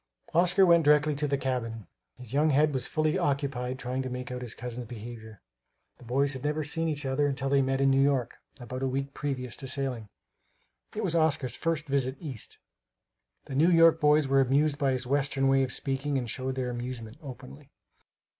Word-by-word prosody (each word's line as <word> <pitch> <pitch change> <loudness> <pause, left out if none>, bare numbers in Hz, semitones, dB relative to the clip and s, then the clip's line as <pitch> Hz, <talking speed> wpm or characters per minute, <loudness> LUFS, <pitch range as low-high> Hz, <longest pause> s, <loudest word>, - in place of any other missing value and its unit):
Oscar 180 +3 +4
went 170 -2 +5
directly 150 +1 +4
to 150 +1 0
the 140 0 0
cabin. 115 -5 -3 0.3
His 125 -1 -10
young 150 +3 +3
head 150 +1 +3
was 130 -1 -2
fully 155 0 0
occupied 135 -3 -1
trying 130 0 -3
to 130 - -4
make 125 0 -5
out 125 0 -5
his 120 -2 -6
cousin's 120 0 -6
behavior. 110 -2 -9 0.6
The - - -14
boys 135 +4 +1
had 130 - -7
never 150 +1 -1
seen 165 +3 -2
each 150 -3 -3
other 135 +2 +1
until 135 -1 -2
they 140 0 +4
met 135 0 0
in 135 0 +4
New 135 0 +4
York, 135 -4 +1 0.2
about 125 +1 -6
a 135 - +1
week 135 +1 -3
previous 130 -4 -4
to 135 - -7
sailing. 130 -5 -3 0.9
It - - -2
was 165 - -1
Oscar's 150 -6 +1
first 165 -2 -1
visit 135 -2 0
East. 135 - -6 0.9
The - - -8
New 155 +6 +4
York 165 -1 +6
boys 150 -1 +4
were 135 0 +4
amused 140 +3 +2
by 140 -2 +2
his 130 -1 -2
Western 135 0 +1
way 135 0 +4
of 130 -1 0
speaking 135 +1 -1
and 125 -2 -2
showed 130 +3 -3
their 125 -1 -2
amusement 120 -1 -6
openly. 120 - -11
135 Hz, 200 wpm, -28 LUFS, 125-145 Hz, 0.9 s, York